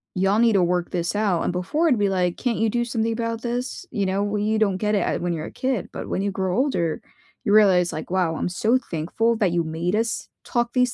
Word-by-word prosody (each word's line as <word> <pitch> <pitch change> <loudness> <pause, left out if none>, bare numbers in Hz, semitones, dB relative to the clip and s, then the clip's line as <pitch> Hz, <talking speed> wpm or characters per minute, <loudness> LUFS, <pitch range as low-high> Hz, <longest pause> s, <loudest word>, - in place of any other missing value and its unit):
y'all 195 +3 +2
need 230 -1 +4
to 195 -3 +4
work 175 0 0
this 175 +2 -2
out." 200 -5 +1
And - - 0
before 285 - 0
it'd 250 -6 +2
be 205 - +3
like, 180 -2 0
"Can't 245 -3 -1
you 225 0 +2
do 240 +2 0
something 230 -1 -1
about 230 0 -2
this?" 245 +9 -3
You 205 -4 -1
know? 190 +2 0
Well, 205 0 -1
you 215 +1 +1
don't 200 -4 +2
get 210 +2 0
it, 200 - +2
uh, - - 0
when 175 -1 -1
you're 160 -2 -4
a - - -8
kid, 255 -7 -2
but - - -6
when - - -1
you 200 0 -1
grow 190 -1 -1
older, 175 - 0 0.4
you 205 - +2
realize 185 -5 +5
like, 155 - -6
"Wow, 180 -3 +1
I'm - - -2
so 220 +7 +2
thankful 190 +8 0
that 200 -6 +2
you 170 0 +1
made 165 +4 -2
us 225 +1 -1 0.2
talk 240 -1 0
these 250 -1 +2
205 Hz, 260 wpm, -23 LUFS, 180-230 Hz, 0.4 s, realize